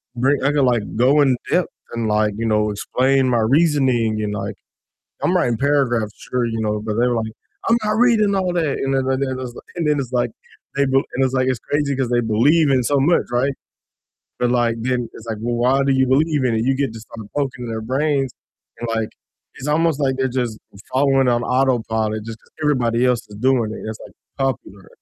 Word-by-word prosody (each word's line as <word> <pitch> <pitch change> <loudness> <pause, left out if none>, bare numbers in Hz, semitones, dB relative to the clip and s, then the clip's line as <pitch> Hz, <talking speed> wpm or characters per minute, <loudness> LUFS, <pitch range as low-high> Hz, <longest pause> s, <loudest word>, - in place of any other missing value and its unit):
bring 135 +3 +1
I 140 - +3
could, 145 -2 +2
like, 120 -4 +2
go 135 +6 +4
in 135 -3 +4 0.2
depth 180 -1 +2 0.3
and 115 -2 -2
like, 105 0 +1
you 115 - -2
know, 105 -1 +2
explain 130 +5 +1
my 120 -2 +2
reasoning 125 -4 +2
and, 105 -1 -2
like, 100 0 -4 0.7
I'm - - +2
writing 120 -1 +1
paragraphs 125 -6 +1
sure, 125 -1 -2
you 115 -1 -3
know, 105 -1 -1
but 105 0 -3
they're 120 +1 +2
like, 110 -1 -2 0.4
"I'm 230 - +5
not 210 - +1
reading 220 -3 +3
all 185 -2 0
that," 160 -5 0
and 135 0 -1
then 135 - +1 0.2
then 130 -2 -2
it's, 125 -2 -6
like - - -11
and 165 -3 -1
then 150 - +2
it's 125 -2 -6
like 120 -1 +1 0.5
they 140 - +3
b 130 - -2 0.2
and 135 +1 +2
it's, 130 - -1
like, 130 0 +2
it's 130 -3 0
crazy 145 -2 -1
'cause 130 -2 0
they 120 - +3
believe 135 +8 +3
in 130 -2 +3
so 140 +4 +1
much, 165 +5 +3
right, 130 +3 +1 0.9
but, 125 -1 +1
like, 120 -2 +1
then 125 -1 -1
it's 115 - -12
like, 110 -2 -3
"Well, 120 +1 -1
why 130 +3 +2
do 135 - +2
you 130 0 +3
believe 145 +1 +2
in 120 - +1
it?" 110 +1 0
You 135 - +2
get 135 -4 -1
to 115 - -9
start 110 -1 -10
poking 130 -4 -2
their 110 -1 -3
brains 135 +2 0 0.5
and, 120 - -4
like, 110 -1 -1 0.5
it's 140 - -6
almost 155 -1 +1
like 130 -2 +1
they're 130 0 0
just 120 -3 -2 0.3
following 135 -1 +3
on 120 0 +2
autopilot 110 -5 0
just 115 0 -7
'cause - - -28
everybody 125 -5 +1
else 125 -2 +1
is 105 - -11
doing 120 -1 +1 0.2
it's, 110 - -6
like, - - -12 0.3
popular 120 -7 -3
125 Hz, 220 wpm, -20 LUFS, 115-140 Hz, 0.9 s, I'm